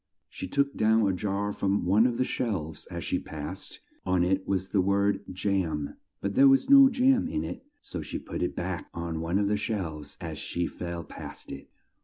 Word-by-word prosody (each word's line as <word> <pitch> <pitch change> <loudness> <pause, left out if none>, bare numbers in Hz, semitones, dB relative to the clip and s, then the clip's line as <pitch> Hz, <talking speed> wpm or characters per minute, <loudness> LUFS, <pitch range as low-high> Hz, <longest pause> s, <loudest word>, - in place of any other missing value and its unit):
She - - -6
took 140 +6 +1
down 110 -1 +3
a 95 - +2
jar 100 +2 -1
from 100 -1 0
one 105 +6 +5
of 120 -2 -2
the - - +2
shelves 90 -13 -3
as - - -5
she - - 0
passed. 75 -1 -7 0.2
On 90 -1 +2
it 95 +1 0
was 95 -1 -1
the 100 - +3
word 100 +1 +2
Jam, 90 -6 -1 0.3
but 100 - -2
there 135 +6 +7
was 135 - +4
no 275 -1 +10
jam 260 +1 +3
in 305 +4 -2
it, - - -6 0.2
so 90 - -6
she 75 - -5
put - - -6
it - - -1
back - - -4
on 85 -1 -3
one 85 +3 0
of 100 0 +2
the 105 +1 +1
shelves 90 - -4
as - - -6
she 85 0 -2
fell 85 -1 -5
past - - -9
it. 70 - -9
100 Hz, 205 wpm, -28 LUFS, 85-110 Hz, 0.3 s, no